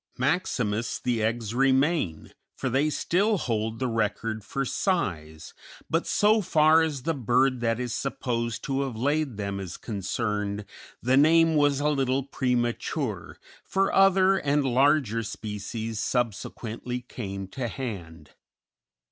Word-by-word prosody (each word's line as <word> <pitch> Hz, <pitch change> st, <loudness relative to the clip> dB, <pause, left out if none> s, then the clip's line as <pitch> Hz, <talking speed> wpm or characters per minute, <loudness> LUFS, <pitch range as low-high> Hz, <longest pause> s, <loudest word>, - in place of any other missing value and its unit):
Maximus 125 Hz, -, 0 dB
the 120 Hz, -3 st, -1 dB
eggs 115 Hz, 0 st, -1 dB
remain, 135 Hz, -, +1 dB, 0.2 s
for 130 Hz, -, -2 dB
they 140 Hz, +5 st, +2 dB
still 200 Hz, +7 st, +1 dB
hold 110 Hz, -6 st, -2 dB
the 130 Hz, -, -1 dB
record 110 Hz, -1 st, -1 dB
for 135 Hz, +5 st, -3 dB
size; 85 Hz, -, -2 dB, 0.4 s
but -, -, +1 dB
so 215 Hz, +1 st, +3 dB
far 160 Hz, -2 st, +5 dB
as 150 Hz, -5 st, -2 dB
the 165 Hz, -, 0 dB
bird 130 Hz, 0 st, +2 dB
that 115 Hz, 0 st, 0 dB
is 125 Hz, -2 st, -3 dB
supposed 120 Hz, -4 st, -2 dB
to 135 Hz, 0 st, -1 dB
have 135 Hz, -4 st, -3 dB
laid 140 Hz, 0 st, 0 dB
them 100 Hz, -1 st, -3 dB
is 95 Hz, -2 st, -6 dB
concerned, 105 Hz, 0 st, -3 dB, 0.4 s
the 130 Hz, +3 st, +3 dB
name 165 Hz, +3 st, +5 dB
was 145 Hz, -2 st, +3 dB
a 145 Hz, -, +1 dB
little 135 Hz, -2 st, +1 dB
premature, 125 Hz, -3 st, -2 dB, 0.3 s
for 195 Hz, 0 st, 0 dB
other 195 Hz, 0 st, +5 dB
and 145 Hz, 0 st, +1 dB
larger 130 Hz, -3 st, +3 dB
species 110 Hz, +1 st, -5 dB
subsequently 120 Hz, +1 st, -3 dB
came 100 Hz, -6 st, -6 dB
to 125 Hz, +5 st, -4 dB
hand. 90 Hz, -, -7 dB
125 Hz, 130 wpm, -26 LUFS, 110-145 Hz, 0.4 s, far